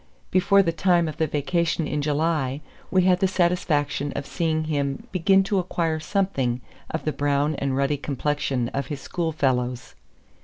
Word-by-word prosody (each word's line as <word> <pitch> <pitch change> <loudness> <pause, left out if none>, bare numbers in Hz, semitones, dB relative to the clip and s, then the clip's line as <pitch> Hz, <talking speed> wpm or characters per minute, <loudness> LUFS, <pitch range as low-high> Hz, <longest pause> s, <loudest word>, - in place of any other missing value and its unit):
Before 195 +2 +4
the 170 - +1
time 170 0 +2
of 155 - -5
the 160 -2 +1
vacation 160 +2 0
in 150 - -1
July 150 -2 0 0.3
we 185 -1 +3
had 180 -1 +4
the 190 - +3
satisfaction 170 -6 0
of 140 - -3
seeing 160 0 -1
him 140 -3 -2
begin 195 +1 +4
to 195 0 0
acquire 165 -3 -1
something 155 - 0 0.3
of 160 - -4
the 155 - 0
brown 145 +1 +1
and 135 -1 -1
ruddy 140 +1 +1
complexion 140 -3 -1
of 140 - -3
his 145 -3 -5
schoolfellows. 130 -7 -1
155 Hz, 160 wpm, -24 LUFS, 140-175 Hz, 0.3 s, Before